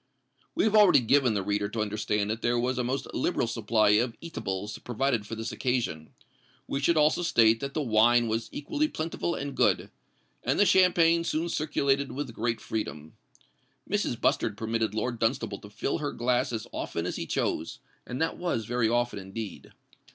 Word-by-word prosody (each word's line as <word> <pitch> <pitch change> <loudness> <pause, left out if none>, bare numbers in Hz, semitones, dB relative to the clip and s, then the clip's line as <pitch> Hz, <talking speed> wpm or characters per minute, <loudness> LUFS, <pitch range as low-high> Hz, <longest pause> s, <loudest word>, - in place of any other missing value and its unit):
We - - +2
have 220 -1 +2
already 205 -10 +7
given 125 -1 +3
the 100 - 0
reader 100 +1 -1
to 110 - -5
understand 105 0 -1
that 110 +1 -4
there 120 0 +1
was 125 +2 0
a - - +1
most 130 +2 -2
liberal - - 0
supply 115 -2 +1
of 115 +3 +2
eatables 105 - -5
provided 120 -3 -1
for 115 - -5
this 110 0 -4
occasion: 120 -12 -2 0.6
we 135 - -2
should 160 +4 +2
also 150 +3 +3
state 115 -9 +4
that 140 0 -5
the 155 - 0
wine 120 0 +4
was 115 +1 -2
equally 295 - -1
plentiful 165 - -3
and 140 0 -4
good; 105 -8 +2 0.5
and - - 0
the 205 - +6
champagne 170 -3 +4
soon 170 0 -1
circulated 140 -3 0
with 135 -3 -5
great 115 +1 -1
freedom. 80 -8 -5 0.7
Mrs. - - -1
Bustard - - +1
permitted 115 -1 -1
Lord 120 +1 -2
Dunstable 115 -3 -1
to 105 - -12
fill 135 +9 -2
her 145 -2 -2
glass 125 +2 0
as 110 -2 -4
often 85 - -4
as - - -3
he - - -4
chose; - - -2 0.3
and 125 - -5
that 160 - 0
was 170 -11 -2
very 120 0 +1
often 120 -2 0
indeed. 100 +2 -7
120 Hz, 180 wpm, -28 LUFS, 110-140 Hz, 0.7 s, already